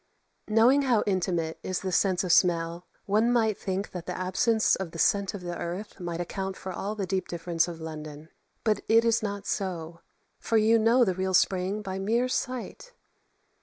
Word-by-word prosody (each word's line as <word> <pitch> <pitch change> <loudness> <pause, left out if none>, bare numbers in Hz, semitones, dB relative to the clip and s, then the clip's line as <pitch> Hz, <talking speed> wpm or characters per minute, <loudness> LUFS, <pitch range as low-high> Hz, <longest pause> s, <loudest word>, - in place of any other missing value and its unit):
Knowing 230 +6 +5
how 245 -6 +2
intimate 175 -4 -1
is 185 - -3
the 190 - -3
sense 185 0 +2
of 180 - 0
smell, 170 0 +2 0.2
one 215 +4 +2
might 220 -3 +2
think 195 0 -4
that 175 -2 -7
the - - -4
absence 205 +5 +2
of 190 -3 -4
the 165 - -10
scent 200 +4 +2
of 195 - -7
the 175 -1 -5
earth 180 +6 -6
might 175 -1 -4
account 190 +2 -4
for 185 - -6
all 205 +4 -4
the 200 -2 -2
deep 190 0 -2
difference 170 0 -1
of 170 -2 -7
London. 155 -1 -8 0.3
But 215 -3 +1
it 225 +1 +5
is 230 0 +3
not 200 -1 -4
so; 170 -4 -3 0.4
for 225 - +1
you 220 +1 +4
know 235 +3 +4
the 190 - +1
real 190 +1 -1
spring 190 +3 +1
by 190 -1 -4
mere 230 +6 +1
sight. 255 - -4
190 Hz, 190 wpm, -27 LUFS, 175-220 Hz, 0.4 s, Knowing